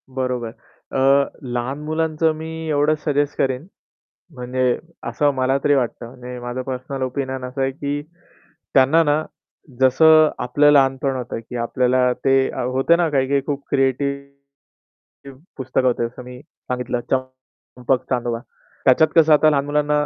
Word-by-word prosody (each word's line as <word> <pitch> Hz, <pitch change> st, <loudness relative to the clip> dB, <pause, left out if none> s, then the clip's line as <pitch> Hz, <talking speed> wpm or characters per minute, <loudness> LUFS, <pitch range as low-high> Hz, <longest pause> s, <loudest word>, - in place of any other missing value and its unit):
बरोबर.अ, 130 Hz, +2 st, -1 dB, 0.3 s
लहान 125 Hz, +4 st, -3 dB
मुलांचं 160 Hz, +1 st, 0 dB
मी 160 Hz, +1 st, -7 dB
एवढंच 150 Hz, +1 st, +1 dB
सजेस्ट 145 Hz, -1 st, 0 dB
करेन. 130 Hz, +2 st, -1 dB, 0.7 s
म्हणजे 125 Hz, 0 st, -1 dB, 0.3 s
असं 145 Hz, -2 st, +1 dB
मला 130 Hz, +1 st, +1 dB
तरी 145 Hz, -, +3 dB
वाटतं 120 Hz, -2 st, -2 dB
म्हणजे 125 Hz, 0 st, -9 dB
माझं 120 Hz, +1 st, -5 dB
पर्सनल 130 Hz, +1 st, -5 dB
ओपिनियन 130 Hz, 0 st, -4 dB
असं 130 Hz, +2 st, -5 dB
आहे 135 Hz, 0 st, +1 dB
की 145 Hz, +1 st, -4 dB, 0.7 s
त्यांना 135 Hz, +5 st, +5 dB
ना, 150 Hz, 0 st, +1 dB, 0.6 s
जसं 155 Hz, +4 st, +6 dB
आपलं 145 Hz, +4 st, +3 dB
लहानपण 135 Hz, -1 st, +2 dB
होतं 125 Hz, -2 st, -5 dB
की 115 Hz, +2 st, -11 dB
आपल्याला 125 Hz, +1 st, +1 dB
ते 135 Hz, 0 st, +4 dB, 0.2 s
होत 130 Hz, +5 st, -1 dB
ना 170 Hz, -2 st, +1 dB
काही 135 Hz, -3 st, +1 dB
काही 140 Hz, 0 st, +2 dB
खूप 140 Hz, -1 st, -3 dB
क्रिएटिव्ह 140 Hz, 0 st, -5 dB, 0.2 s
पुस्तक 130 Hz, -1 st, -1 dB
होते 120 Hz, -2 st, +1 dB
जसं 125 Hz, +2 st, -12 dB
मी 125 Hz, 0 st, -10 dB
सांगितलं 125 Hz, -4 st, -5 dB
चंपक-चांदोबा. 130 Hz, -2 st, -3 dB, 0.5 s
त्याच्यात 155 Hz, +5 st, +5 dB
कसं 160 Hz, -2 st, +6 dB
आता 155 Hz, +1 st, +5 dB
लहान 140 Hz, -2 st, +1 dB
मुलांना 150 Hz, 0 st, +1 dB
135 Hz, 135 wpm, -20 LUFS, 125-145 Hz, 0.7 s, जसं